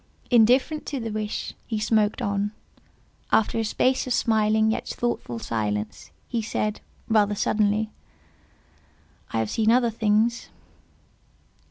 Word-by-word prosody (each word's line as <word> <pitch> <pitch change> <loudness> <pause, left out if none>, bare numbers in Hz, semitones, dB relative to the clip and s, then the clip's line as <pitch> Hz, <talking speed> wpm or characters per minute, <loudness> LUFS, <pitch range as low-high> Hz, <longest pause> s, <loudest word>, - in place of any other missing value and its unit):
Indifferent 250 +6 +4
to 280 - -3
the 225 -2 -4
wish, 215 0 -3
he 220 - -2
smoked 215 -1 +1
on. 200 +1 -1 0.8
After 225 +1 +2
a - - +1
space 255 +5 +1
of 255 - 0
smiling 220 -1 +2
yet - - -3
thoughtful 235 - -3
silence, 105 -2 -3 0.2
he 235 -2 -1
said, 215 -1 -2 0.3
rather 210 -2 +3
suddenly—"I 205 - -5
have 110 -1 -1
seen 220 -1 +1
other 240 0 +4
things." 220 +2 +1
215 Hz, 120 wpm, -25 LUFS, 205-230 Hz, 0.8 s, Indifferent